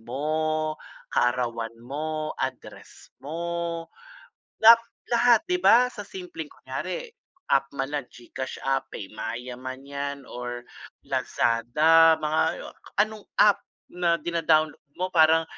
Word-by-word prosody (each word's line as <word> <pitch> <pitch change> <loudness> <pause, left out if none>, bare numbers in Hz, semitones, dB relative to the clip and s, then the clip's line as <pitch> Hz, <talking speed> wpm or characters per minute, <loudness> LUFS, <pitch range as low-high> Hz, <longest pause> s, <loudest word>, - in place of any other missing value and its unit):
mo, 155 +5 -1 0.4
kaarawan 120 -2 0
mo, 155 +3 -3
address 130 -1 -7
mo. 170 +2 -3 0.7
Lat 230 +1 +8 0.2
lahat 240 0 +5
'di 360 0 0
ba, 245 +2 +7
sa 225 -4 -7
simpleng 180 -6 -8
kunyari, - - -6 0.4
app 135 0 +3
man 135 +1 -2
na 145 - 0
GCash 125 +1 -8
app, 135 0 0
eh, 100 - -6
PayMaya 115 +4 -6
man 130 +2 -8
'yan 140 0 -5
or 120 0 -6 0.4
Lazada, 155 +8 +4
mga 160 +2 -1 0.3
anong 215 0 +1 0.2
app 205 -1 +5 0.3
na 175 -1 +2
dina-download 155 -2 +1 0.2
mo 185 +1 -2
parang 160 0 +5
155 Hz, 115 wpm, -26 LUFS, 130-170 Hz, 0.7 s, Lat